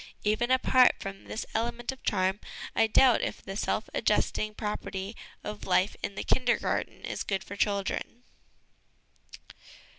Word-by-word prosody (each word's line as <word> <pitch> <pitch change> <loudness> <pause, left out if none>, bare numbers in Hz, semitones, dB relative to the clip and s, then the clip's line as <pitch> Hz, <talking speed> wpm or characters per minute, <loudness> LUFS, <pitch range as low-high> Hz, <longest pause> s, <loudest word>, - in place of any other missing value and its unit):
Even 215 +3 +1
apart 255 -1 +5
from 195 0 -7
this 220 - -4
element 235 +2 -1
of 265 - -11
charm, 190 0 +1 0.4
I 225 - +4
doubt 245 +2 +5
if - - -2
the 195 - -7
self - - -1
adjusting 215 0 +1
property 210 -1 -4 0.3
of 210 0 -6
life 185 +1 +3
in 200 - -4
the - - -3
Kindergarten 245 -2 0
is - - -4
good 195 -2 -1
for 200 - -8
children. 200 +4 -1
210 Hz, 140 wpm, -29 LUFS, 195-240 Hz, 0.4 s, apart